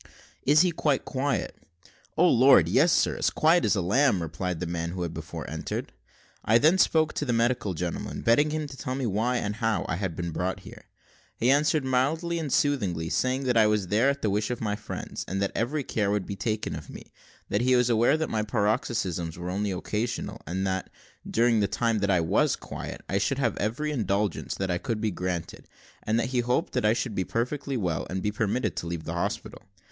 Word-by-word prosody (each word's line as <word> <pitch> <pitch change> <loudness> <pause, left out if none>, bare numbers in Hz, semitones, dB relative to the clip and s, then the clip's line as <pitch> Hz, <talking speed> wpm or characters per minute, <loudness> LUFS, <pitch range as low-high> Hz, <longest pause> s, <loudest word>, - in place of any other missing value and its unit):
"Is 150 +2 +6
he 180 -1 +3
quite 150 -4 0
quiet?" 140 +1 -2 0.6
"O 180 - +5
Lord! 130 - +6
yes, 140 - +4
sir, - - +2
as - - +2
quiet 165 +3 +3
as - - +3
a 95 - 0
lamb," 115 +3 +3
replied 85 +2 -3
the 90 - -2
man 85 0 -3
who 90 +1 -4
had 85 -1 -4
before - - -7
entered. - - -5 0.5
I 110 - +5
then 160 +9 +4
spoke 160 -3 +3
to - - -2
the 130 - -1
medical 115 -5 +1
gentleman, 85 +1 -4
begging 130 +7 +4
him 155 0 -2
to 135 -2 -9
tell 130 0 -4 0.2
why, 120 +5 +1
and 105 -2 -3
how, 115 -2 0
I 85 - -2
had 95 -4 -3
been 85 0 -3
brought 90 +3 -2
here. - - -13 0.5
He 120 +3 +3
answered 150 0 +2
mildly 160 +7 0
and 150 -4 -4
soothingly, 100 - +1
saying 130 +1 0
that 125 -2 +1
I 110 -2 +6
was 105 -4 0
there 115 +7 +3
at 140 0 -2
the 105 - +1
wish 105 +1 0
of 125 - -3
my 105 -2 -1
friends, 105 0 -6
and 95 +2 -2
that 100 0 0
every 140 +5 -1
care 105 -5 -1
would 100 -2 0
be 100 - -5
taken 110 +1 -2
of - - -9
me; - - -11 0.4
that 100 - +1
he 130 +1 +3
was 125 -1 +3
aware 120 +6 +4
that 160 - -1
my 110 - -1
paroxysms 105 -6 -1
were 90 +1 -4
only 100 +2 -1
occasional, 105 +6 -3
and 95 +4 -2
that, 95 -1 -2 0.4
during 115 -1 +3
the 100 - +2
time 110 +2 0
that 100 0 0
I 90 -3 +3
was 80 - +2
quiet, - - -7
I 100 - 0
should 135 +7 0
have 120 -6 0
every 120 +9 -1
indulgence 105 - -1
that 90 -2 -2
could 115 -2 -2
be 110 -1 0
granted, 90 -2 -4 0.3
and 110 +2 0
that 120 - -1
he 130 -1 0
hoped 125 +1 0
that - - 0
I 105 - +5
soon - - -3
should 120 -2 -2
be 95 - 0
perfectly 130 +6 -2
well, 90 -7 -2
and 95 +1 -3
be 105 - 0
permitted 110 +4 -1
to 85 - -3
leave 85 -1 -4
the - - -5
hospital. - - -3
110 Hz, 220 wpm, -27 LUFS, 95-130 Hz, 0.6 s, Is